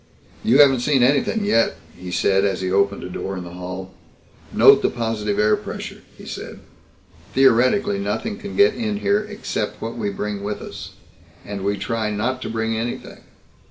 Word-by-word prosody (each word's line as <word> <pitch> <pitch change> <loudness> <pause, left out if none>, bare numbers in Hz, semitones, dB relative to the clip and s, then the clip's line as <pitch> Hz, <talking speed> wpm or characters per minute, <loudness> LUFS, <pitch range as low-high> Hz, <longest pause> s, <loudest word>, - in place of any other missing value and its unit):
"You 120 +4 +4
haven't 135 -3 +7
seen 130 0 +2
anything 140 - +2
yet," 115 - +2 0.2
he 90 0 -9
said 95 +2 +2
as 95 -2 0
he 95 0 -1
opened 100 +1 +1
a - - -5
door 95 +1 -4
in 90 - -5
the 85 - -9
hall. 90 +1 -7 0.6
"Note - - +7
the - - +2
positive 110 -3 -2
air 105 0 +4
pressure," - - -7 0.2
he - - -12
said. - - -7 0.8
"Theoretically 135 - +4
nothing 205 +2 -3
can 205 -3 -7
get 410 +1 +5
in 215 -3 -2
here 200 +1 +3
except 210 - -4
what 115 +1 -5
we 105 -3 -2
bring 100 0 -4
with 105 +1 -3
us. - - -9 0.5
And 100 -2 -5
we 100 +1 0
try 115 -1 -2
not 115 +5 -2
to - - -4
bring 110 0 -1
anything." 115 +2 -5
115 Hz, 180 wpm, -21 LUFS, 100-135 Hz, 0.8 s, haven't